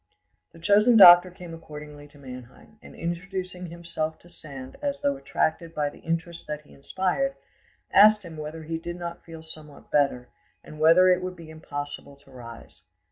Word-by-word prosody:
The - - -17
chosen 210 +7 +4
doctor 175 -2 +10
came 175 -1 -11
accordingly 150 -2 -11
to 145 - -20
Mannheim, 130 - -13
and - - -14
introducing 180 +1 -5
himself 170 -2 -5
to 175 - -19
Sand 135 -6 -10
as 285 -1 -2
though 285 -1 +1
attracted 165 -9 -2
by 145 -1 -1
the - - -16
interest 165 0 -4
that 150 0 -5
he 150 - -20
inspired, 190 - -2 0.6
asked 210 +1 +6
him 165 -3 -10
whether 155 +1 -7
he 160 +1 -4
did 175 +1 -6
not 170 -1 -7
feel 165 -1 -11
somewhat 155 -2 -12
better, 140 -4 +1 0.3
and 155 - -12
whether 165 +4 +6
it 180 0 +3
would 185 0 -5
be 165 -2 -12
impossible 145 -2 -7
to 140 -1 -22
rise. 115 -2 -12
165 Hz, 175 wpm, -25 LUFS, 150-180 Hz, 0.6 s, doctor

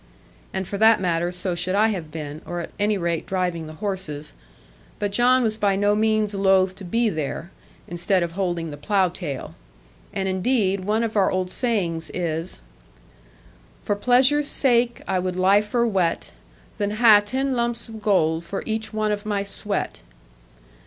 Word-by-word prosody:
And 190 -1 -3
for 200 - -4
that 220 +1 +6
matter 175 -1 0
so 180 0 -3
should 180 +2 -1
I 215 +2 +4
have 175 -7 -4
been, 150 -1 -7
or 175 0 -5
at 170 - -6
any 205 0 +2
rate 170 -3 -2
driving 180 -4 -2
the 155 - -8
horses; 160 -6 -5 0.6
but 205 -1 -2
John 250 +4 +4
was 220 -1 -1
by 200 -1 +2
no 205 +1 +2
means 215 -1 +1
loath 190 -1 +3
to 200 - -9
be 230 +6 +1
there, 160 0 -3 0.4
instead 175 +2 +1
of 170 - -3
holding 175 -3 -2
the 145 - -7
plough 190 +4 +2
tail. 165 -7 -6 0.6
And 190 -1 -2
indeed, 190 -1 +1
one 215 +3 +1
of 225 -1 -3
our 195 -2 +4
old 185 -1 -1
sayings 180 -10 -1
is, 165 - -3 1.2
For 205 - 0
pleasure's 260 +7 +3
sake 240 -4 +1
I 190 -1 +1
would 180 0 -2
liefer 205 +5 +3
wet, 185 -7 0 0.5
Than 205 0 0
ha' 215 -2 +7
ten 265 +5 -1
lumps 235 0 -1
of 220 -1 -9
gold 170 -6 +2
for 195 +4 -5
each 220 -1 -3
one 215 0 0
of 205 0 -2
my 205 -2 -1
sweat. 200 0 -3
195 Hz, 170 wpm, -23 LUFS, 175-215 Hz, 1.2 s, ha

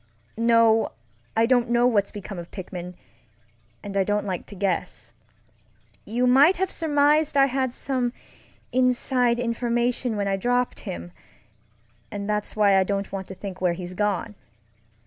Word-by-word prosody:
No, 230 - +3 0.4
I 225 - +5
don't 245 -1 +2
know 240 0 +3
what's 210 -5 +2
become 200 -2 -7
of 170 - -9
Pickman, 180 -2 -7 0.9
and 200 -1 -7
I 195 - +3
don't 205 +1 -1
like 185 -3 -4
to 205 - -10
guess. 195 -1 -3 0.9
You 245 +3 0
might 275 +8 +6
have 380 +1 -1
surmised 300 -1 +2
I 275 - +7
had 260 -1 -1
some 250 -1 -2 0.6
inside 250 -1 +2
information 240 0 0
when 200 -1 -1
I 195 0 0
dropped 245 +4 -1
himŌĆöand 85 0 -6 1.1
that's 210 0 -2
why 205 -2 +4
I - - +4
don't 200 +1 -3
want 190 -1 -5
to 190 - -8
think 190 -1 -8
where 180 -2 +2
he's 180 +1 -7
gone. 210 +2 -1
225 Hz, 145 wpm, -24 LUFS, 195-250 Hz, 1.1 s, I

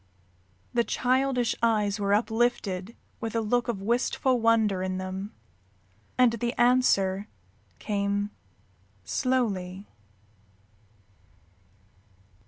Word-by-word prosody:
The 235 - +3
childish 255 0 +1
eyes 210 -3 +1
were 200 0 +2
uplifted 220 -3 -1 0.2
with 225 -1 -4
a - - +2
look 240 +3 0
of 205 -5 -3
wistful 245 +3 +1
wonder 220 -4 +3
in 185 0 -2
them, 190 +2 -5 0.9
and 250 -2 +5
the 235 +1 -2
answer 205 -6 +3 0.5
came 205 0 -1 0.7
slowly. 200 - -1
220 Hz, 85 wpm, -27 LUFS, 200-240 Hz, 0.9 s, and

